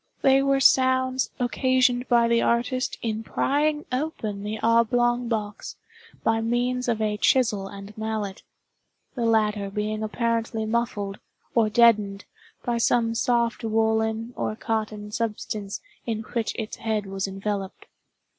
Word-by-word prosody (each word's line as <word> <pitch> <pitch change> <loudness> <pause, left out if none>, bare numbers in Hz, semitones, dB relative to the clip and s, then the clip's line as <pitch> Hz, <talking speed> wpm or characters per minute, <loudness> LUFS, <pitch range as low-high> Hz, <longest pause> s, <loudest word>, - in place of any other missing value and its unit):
They 270 0 +5
were 275 0 +2
sounds 260 -1 +3
occasioned 250 0 +2
by 235 -1 +4
the 235 0 +3
artist 245 +2 0
in 220 -1 -1
prying 295 +6 0
open 255 -7 -3
the 210 +2 -4
oblong 240 +1 +3
box, 215 -3 -4 0.5
by 225 0 +2
means 245 +2 0
of 230 -2 0
a 210 -1 0
chisel 210 -4 +2
and 200 +1 -10
mallet—the 220 +3 -7
latter 210 -3 +2
being 210 +1 -2
apparently 225 0 -1
muffled, 215 -3 -2 0.3
or 225 -2 +3
deadened, 215 -3 +3 0.4
by 240 -2 0
some 230 -1 +2
soft 235 0 +1
woollen 220 +1 0
or 215 - -2
cotton 215 -2 -3
substance 210 -2 -3 0.3
in 225 -1 -2
which 230 -2 -1
its 220 -2 -5
head 215 -2 -1
was 195 0 -3
enveloped. 195 0 -4
225 Hz, 125 wpm, -25 LUFS, 215-245 Hz, 0.5 s, They